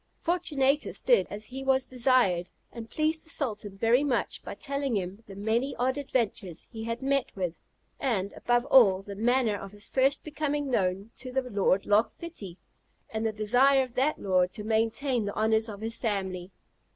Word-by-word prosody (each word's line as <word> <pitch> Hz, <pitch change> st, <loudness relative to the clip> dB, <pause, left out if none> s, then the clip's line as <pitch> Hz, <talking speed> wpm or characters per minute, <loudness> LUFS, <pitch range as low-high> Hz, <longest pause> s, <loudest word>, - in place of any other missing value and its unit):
Fortunatus 300 Hz, -5 st, +1 dB
did -, -, +4 dB
as 210 Hz, +1 st, -5 dB
he 265 Hz, +3 st, -6 dB
was 265 Hz, -1 st, +2 dB
desired, 240 Hz, -9 st, +2 dB, 0.2 s
and 230 Hz, -1 st, -9 dB
pleased 315 Hz, +1 st, 0 dB
the 325 Hz, -, -11 dB
sultan 210 Hz, -10 st, -2 dB
very 235 Hz, +6 st, +3 dB
much 260 Hz, -5 st, -1 dB
by -, -, -7 dB
telling 275 Hz, -5 st, -1 dB
him 190 Hz, +3 st, -5 dB
the 195 Hz, -, -10 dB
many 225 Hz, +7 st, -1 dB
odd 260 Hz, +1 st, 0 dB
adventures 225 Hz, -, -2 dB
he 220 Hz, -2 st, -6 dB
had 230 Hz, +3 st, -4 dB
met 275 Hz, -1 st, 0 dB
with; 180 Hz, -4 st, -3 dB, 0.4 s
and, 205 Hz, -8 st, -1 dB
above 240 Hz, +1 st, +1 dB
all, 195 Hz, -7 st, +6 dB
the 200 Hz, -, -7 dB
manner 230 Hz, +1 st, +2 dB
of 195 Hz, 0 st, -8 dB
his 205 Hz, 0 st, -5 dB
first 270 Hz, +2 st, +2 dB
becoming 295 Hz, -2 st, -2 dB
known 195 Hz, 0 st, 0 dB
to 255 Hz, -, -6 dB
the 265 Hz, +1 st, 0 dB
Lord 200 Hz, -5 st, +1 dB
Loch 210 Hz, +2 st, +3 dB
Fitty, 210 Hz, -, -7 dB, 0.5 s
and 220 Hz, 0 st, -1 dB
the -, -, -1 dB
desire 250 Hz, +6 st, +4 dB
of 250 Hz, -2 st, -9 dB
that 275 Hz, +5 st, +1 dB
lord 185 Hz, -2 st, +2 dB
to 210 Hz, -, -5 dB
maintain 225 Hz, +3 st, 0 dB
the 200 Hz, -, -4 dB
honours 220 Hz, +1 st, +2 dB
of 205 Hz, -1 st, -8 dB
his 225 Hz, +1 st, -1 dB
family. 190 Hz, -5 st, -2 dB
230 Hz, 180 wpm, -28 LUFS, 205-265 Hz, 0.5 s, all